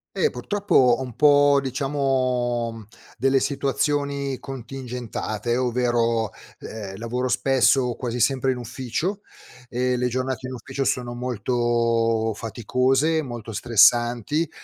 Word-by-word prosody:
Eh, 455 - +2
purtroppo 205 0 -3
ho 125 0 +5
un 125 -4 -7
po', 145 -1 +5
diciamo, 130 -4 -1 0.3
delle 135 +2 +3
situazioni 140 -1 -1
contingentate, 120 -3 -4
ovvero, 120 -3 +1 0.3
ehm, 100 -3 -7
lavoro 125 +3 -2
spesso, 125 -1 +2
quasi 125 0 -4
sempre 130 +2 +2
in - - -4
ufficio 130 - -3 0.5
e 125 +1 0
le 125 0 +1
giornate 130 +1 -3
in 130 - -6
ufficio 130 +3 -4
sono 120 -2 -1
molto 115 -1 0
faticose, 130 +8 +1
molto 120 -4 -7
stressanti 120 +7 +3
125 Hz, 110 wpm, -23 LUFS, 120-135 Hz, 0.5 s, ho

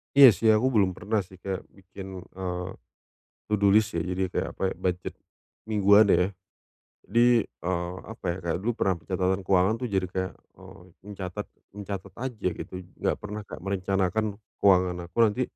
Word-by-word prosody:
Iya 140 -1 +11
sih, 115 - +2
aku 110 +4 +3
belum 100 -3 +4
pernah 100 +3 -1
sih 95 0 -16
kayak 95 0 -4
bikin, 95 0 -11 0.3
eee, 90 -1 -3 0.8
to - - 0
do 100 -1 +4
list 110 -3 +3
ya, - - +1
jadi 90 +1 -1
kayak, - - -2
apa, - - -6
budget 90 -1 -2 0.5
mingguan 105 0 +5
ya. 90 - +3 0.8
Jadi, 120 -1 +4
eee, 90 0 -4
apa 110 -2 -10
ya, - - -5
kayak 85 -1 -1
dulu 120 - +2
pernah 95 -2 +2
pencatatan 95 +2 -1
keuangan 95 +3 +3
itu 125 +2 -3
jadi 95 -1 +1
kayak, 95 +1 -3 0.2
eee, 95 0 -14 0.2
mencatat 100 0 -6 0.3
mencatat 100 -2 -6
aja, 120 -5 -2
gitu. - - -8 0.2
Enggak - - 0
pernah, 105 +1 -6
Kak, - - -9
merencanakan 100 +2 -1 0.2
keuangan 90 -2 +4
aku 85 - -16
nanti 115 +2 +4
95 Hz, 165 wpm, -27 LUFS, 90-105 Hz, 0.8 s, Iya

